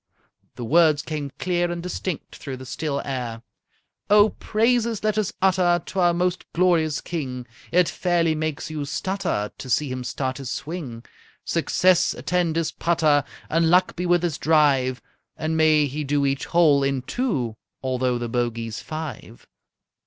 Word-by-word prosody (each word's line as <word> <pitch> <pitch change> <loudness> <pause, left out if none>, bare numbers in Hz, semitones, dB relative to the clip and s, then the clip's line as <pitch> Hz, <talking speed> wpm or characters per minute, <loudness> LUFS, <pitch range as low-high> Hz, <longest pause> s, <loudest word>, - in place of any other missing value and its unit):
The 120 - -5
words 155 +2 +4
came 150 -3 -4
clear 175 0 0
and 170 0 -4
distinct 180 -1 -4
through 130 -2 -7
the 130 - -10
still 140 +1 -3
air: 120 -4 -4 0.7
_"Oh, 210 +1 +6
praises 230 0 +1
let 215 -1 +1
us 215 -4 0
utter 180 -2 +3
To 190 - -4
our 175 -1 +5
most 180 +1 0
glorious 165 -4 +2
King! 130 -7 -4 0.3
It 180 0 +4
fairly 175 -3 +1
makes 155 0 -3
you 150 -2 -3
stutter 175 - -2
To 130 - -9
see 145 +3 +1
him 130 0 -4
start 130 +1 -3
his 135 -3 -6
swing! 140 -7 -6 0.4
Success 185 -1 +2
attend 175 -3 0
his 165 -1 0
putter! 155 -4 +2 0.2
And 165 0 +2
luck 180 +2 +3
be 180 +1 -2
with 175 0 +3
his 170 -5 -1
drive! 140 -5 +2 0.3
And 160 0 -2
may 155 -2 +4
he 145 +2 -3
do 145 0 +1
each 135 0 -1
hole 155 -5 +4
in 135 -2 0
two, 135 - -2 0.3
Although 130 -1 0
the 120 0 -3
bogey's 115 -2 -2
five!" 155 -7 -7
155 Hz, 160 wpm, -23 LUFS, 135-175 Hz, 0.7 s, Oh